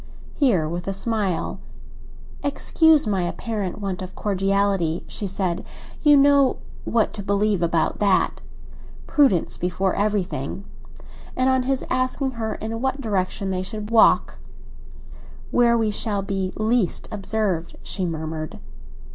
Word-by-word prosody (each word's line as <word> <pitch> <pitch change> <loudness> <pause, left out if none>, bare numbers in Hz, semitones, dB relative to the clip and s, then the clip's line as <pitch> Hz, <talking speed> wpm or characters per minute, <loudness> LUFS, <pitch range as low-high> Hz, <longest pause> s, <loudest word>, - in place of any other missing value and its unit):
Here, 205 - +2
with 175 +3 -5
a 195 - -1
smile—"Excuse 230 - -1
my 200 -3 0
apparent 200 +2 -3
want 195 -3 -3
of 185 0 -7
cordiality," 195 -4 0
she 205 - -4
said. 185 -1 -2 0.4
"You 295 -2 +6
know 280 -1 +5 0.3
what 225 -2 +1
to 205 - -5
believe 200 -1 +1
about 170 -1 +1
that. 200 -2 +2 0.6
Prudence 265 - +2
before 180 +2 0
everything." 200 -5 -2 0.7
And 255 +1 +2
on 260 0 +3
his 270 -1 0
asking 255 +1 0
her 225 -3 -3
in 225 +1 -5
what 265 +1 -1
direction 195 -4 -1
they 185 -1 -1
should 210 +3 -6
walk, 230 -1 +4 1.1
"Where 235 -1 +4
we 220 -2 +1
shall 205 -1 -2
be 195 -1 -2
least 220 -3 0
observed," 195 -4 -2
she 190 - -3
murmured. 160 -2 -4
200 Hz, 125 wpm, -23 LUFS, 185-230 Hz, 1.1 s, You